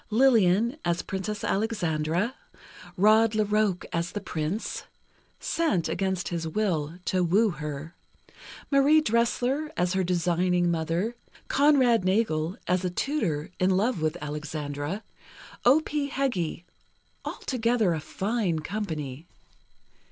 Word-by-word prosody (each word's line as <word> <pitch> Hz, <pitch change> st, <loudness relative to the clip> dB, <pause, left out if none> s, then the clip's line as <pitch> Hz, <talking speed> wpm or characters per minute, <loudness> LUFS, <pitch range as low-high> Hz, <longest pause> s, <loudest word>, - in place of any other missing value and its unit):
Lillian, 230 Hz, -, +4 dB
as 170 Hz, 0 st, 0 dB
Princess 205 Hz, +2 st, -4 dB
Alexandra; 180 Hz, -1 st, 0 dB, 0.6 s
Rod 215 Hz, +3 st, +5 dB
La 215 Hz, 0 st, +2 dB
Roque, 210 Hz, -3 st, +1 dB
as 170 Hz, +1 st, -1 dB
the 205 Hz, -, -2 dB
Prince 175 Hz, +1 st, -3 dB, 0.5 s
(sent, 260 Hz, -, 0 dB
against 190 Hz, +2 st, -1 dB
his 170 Hz, -2 st, -3 dB
will, 165 Hz, -4 st, -1 dB
to 185 Hz, -1 st, +1 dB
woo 200 Hz, +5 st, +3 dB
her); 150 Hz, 0 st, -6 dB, 0.8 s
Marie 280 Hz, +3 st, +6 dB
Dressler, 250 Hz, +3 st, +1 dB
as 180 Hz, +1 st, +1 dB
her 190 Hz, 0 st, +1 dB
designing 175 Hz, 0 st, +1 dB
mother; 170 Hz, +7 st, -1 dB, 0.3 s
Conrad 265 Hz, -7 st, +4 dB
Nagel, 185 Hz, -3 st, +1 dB
as 180 Hz, 0 st, +1 dB
a 180 Hz, -, 0 dB
tutor, 180 Hz, -, -1 dB
in 185 Hz, -, +3 dB
love 195 Hz, +1 st, +1 dB
with 155 Hz, +2 st, 0 dB
Alexandra; 150 Hz, +4 st, -4 dB, 0.6 s
O. 270 Hz, +6 st, +6 dB
P. 295 Hz, -2 st, -2 dB
Heggie—altogether 230 Hz, -, -2 dB
a 160 Hz, -, -2 dB
fine 195 Hz, +1 st, -1 dB
company. 155 Hz, -5 st, -4 dB
190 Hz, 115 wpm, -27 LUFS, 165-230 Hz, 0.8 s, Marie